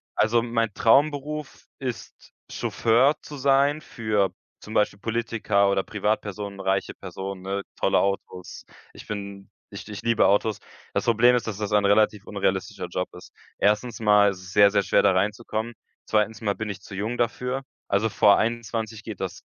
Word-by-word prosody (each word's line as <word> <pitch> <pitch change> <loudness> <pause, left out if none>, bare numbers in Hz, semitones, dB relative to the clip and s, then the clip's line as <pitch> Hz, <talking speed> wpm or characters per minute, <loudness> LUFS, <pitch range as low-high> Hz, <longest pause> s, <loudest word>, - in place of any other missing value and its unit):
Also, 115 +2 +3
mein 115 -3 -1
Traumberuf 145 +3 +1
ist 125 -3 -7 0.2
Chauffeur 125 +6 +2
zu 145 - -9
sein. 140 +2 +3
Für 105 -6 -1 0.3
zum 110 - -10
Beispiel 105 -1 +1
Politiker 110 -2 0
oder 100 -1 +2
Privatpersonen, 105 -1 -3
reiche 95 0 -1
Personen, 95 0 -7
ne? 100 +1 -3 0.2
Tolle - - +2
Autos. 95 -2 -3 0.3
Ich - - -13
bin 100 -2 -7 0.2
ich - - -9
ich 105 - -7
liebe 115 -2 +3
Autos. 105 +1 +2 0.3
Das - - -1
Problem 120 +2 +5
ist, 120 - -1
dass 105 -3 -4
das 105 -1 -3
ein 105 -1 +3
relativ 105 0 +2
unrealistischer 95 -3 -2
Job 90 +1 -3
ist. 90 - -13 0.3
1. 105 +3 +1
mal 105 -2 +5
ist 95 - -9
es 95 +1 -11
sehr, 100 0 +6
sehr 100 -1 +2
schwer, - - +3
da - - +4
reinzukommen. 110 +4 -1 0.3
2. 110 +1 0
mal 105 -2 0
bin 110 +1 -5
ich 95 -2 -6
zu 95 - -10
jung 110 +5 -3
dafür. 125 +3 -1 0.2
Also, 100 +3 +1
vor 100 0 +5
21 110 -1 -2
geht 110 -5 -7
das - - -5
105 Hz, 170 wpm, -25 LUFS, 100-115 Hz, 0.3 s, sehr